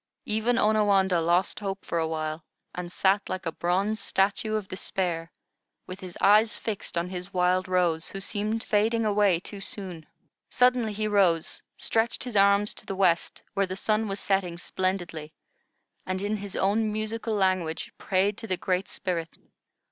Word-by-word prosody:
Even 220 +3 +1
Onawandah 200 -4 +3
lost 175 +3 +2
hope 195 -2 -4
for 170 - -1
a 160 - 0
while, 155 0 -3 0.3
and 175 -1 -5
sat 195 +2 +2
like 185 0 -4
a 165 - -1
bronze 195 +6 0
statue 200 +3 +1
of 210 -3 -2
despair, 175 -3 -3 0.5
with 185 +1 -8
his 185 -3 -8
eyes 215 +3 +5
fixed 210 -5 -4
on 170 +1 -1
his 180 +1 -6
Wild 180 +1 +2
Rose, 175 -3 +1
who 195 - -6
seemed 215 +3 -2
fading 220 +2 +2
away 205 -4 +3
too 200 +2 -9
soon. 180 -6 -5 0.4
Suddenly 250 -3 +3
he 215 +1 -1
rose, 185 -6 +2 0.2
stretched 230 +1 0
his 245 -4 -6
arms 200 +1 +4
to - - -12
the 195 - -3
west, 180 -3 +1
where 195 -1 +1
the 185 - -4
sun 215 +2 0
was 195 0 -3
setting 190 -3 0
splendidly, 175 -4 -3 0.7
and 185 0 -3
in 205 +2 -1
his 200 -1 -7
own 210 +3 +1
musical 220 +1 -2
language 185 -5 0
prayed 195 +2 +1
to 225 - -6
the 185 - -1
Great 185 +1 -1
Spirit. 170 -4 -3
195 Hz, 165 wpm, -27 LUFS, 180-210 Hz, 0.7 s, eyes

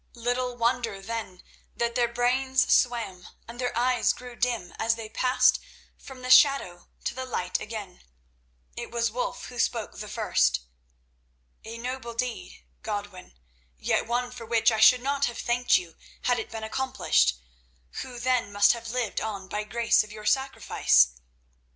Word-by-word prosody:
Little 245 +1 -2
wonder, 235 -3 0
then, 205 -3 -6 0.3
that 235 0 -1
their 240 -1 +2
brains 255 +2 +2
swam, 230 -7 0 0.2
and 240 +2 -8
their 245 -2 -2
eyes 245 -1 +2
grew 250 -1 -10
dim, 235 -7 -1
as 225 0 +2
they 225 -1 -8
passed 255 +3 +3 0.4
from 260 -2 -12
the 255 - -1
shadow 255 -11 +5 0.2
to - - -2
the 260 - -5
light 180 -8 -2
again. 210 -5 -7 0.7
It - - -6
was 235 -1 0
Wulf 245 +1 -3
who 245 -1 -9
spoke 230 -3 -1
the 210 - -6
first. 60 - +1 1.0
"A 225 +1 -8
noble 240 -1 -5
deed, 245 0 -4 0.2
Godwin, 205 - -6 0.4
yet 65 - 0
one 245 +1 -1
for 240 -2 -9
which 230 +1 +3
I 220 - -1
should 250 +3 +6
not 280 +1 +1
have 240 -1 -4
thanked 245 +1 +2
you 170 -2 -7 0.3
had 245 -1 +2
it - - -6
been 225 -1 -6
accomplished, 220 - +1 0.7
who 250 -1 -8
then 245 -3 0
must 205 0 +5
have 230 -1 -7
lived 240 -2 -2
on 200 -3 -4
by 210 +2 -3
grace 230 +1 +2
of 210 - -13
your 215 0 -10
sacrifice. 265 - +3
235 Hz, 160 wpm, -27 LUFS, 215-250 Hz, 1.0 s, should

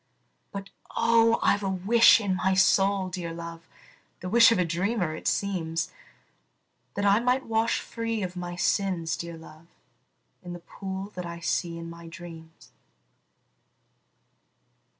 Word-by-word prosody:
But, 195 0 -7 0.3
oh, 230 0 +4
I - - +4
've 205 - -7
a 195 - -1
wish 220 +5 +5
in 200 -4 -1
my 190 +1 +1
soul, 195 0 +3
dear 180 -2 -5
love, 170 0 -8 0.5
(The 180 - -5
wish 230 +2 +7
of 230 - +3
a 180 - +2
dreamer, 175 +1 -1
it - - -6
seems,) 165 -5 -1 1.0
That 200 - -1
I 200 +1 +5
might 250 +2 +1
wash 225 0 +1
free 230 -2 -4
of 180 0 -5
my 175 -1 -5
sins, 180 -3 0
dear 170 -1 -7
love, 160 0 -15 0.7
In 175 -1 -8
the 175 - -7
pool 190 +3 -7
that 180 -1 -5
I 170 0 -7
see 170 0 -2
in 165 0 -7
my 170 0 -10
dreams. 165 -1 -12
185 Hz, 150 wpm, -27 LUFS, 170-205 Hz, 1.0 s, wish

